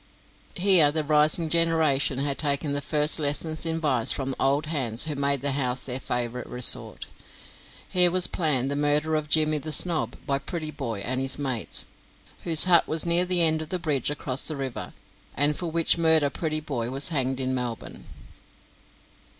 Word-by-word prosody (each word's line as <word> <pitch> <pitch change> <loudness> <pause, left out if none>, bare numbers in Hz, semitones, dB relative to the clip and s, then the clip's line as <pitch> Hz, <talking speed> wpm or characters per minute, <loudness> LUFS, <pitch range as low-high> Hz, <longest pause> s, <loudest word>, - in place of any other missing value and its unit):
Here 180 -5 +4
the 155 0 -2
rising 150 +2 +1
generation 160 -5 0
had 140 0 -3
taken 145 -1 0
their 145 0 -2
first 150 +2 0
lessons 155 +2 -3
in 165 0 -2
vice 130 -8 +1
from 135 -1 -1
the - - -7
old 140 +3 0
hands 130 -7 -2
who 155 - -4
made 140 -1 0
the 140 0 -1
house 130 -2 -2
their 130 0 -4
favourite 125 -1 -5
resort. 125 0 +6 0.8
Here 180 -1 +4
was 180 +1 +1
planned 140 -6 -1
the - - -2
murder 150 +2 0
of 155 -1 -3
Jimmy 155 0 +2
the 155 +2 -6
Snob 165 0 +1
by 140 0 -1
Prettyboy 140 - -6
and 130 +2 -3
his 135 0 -3
mates, 130 -6 -1 0.6
whose 165 -3 +6
hut 175 -2 +4
was 160 +1 -3
near 170 +1 +1
the 180 -1 +2
end 160 -1 +2
of 155 - -7
the 185 - -1
bridge 150 -7 -2
across 140 -2 -2
the 155 - -1
river, 135 -2 -7 0.4
and 145 +2 +2
for 175 +1 -5
which 165 +1 +1
murder 160 -3 +3
Prettyboy 150 -8 -4
was 135 +6 -2
hanged 135 -4 -2
in 130 0 -2
Melbourne. 125 -3 -6
150 Hz, 175 wpm, -24 LUFS, 135-160 Hz, 0.8 s, resort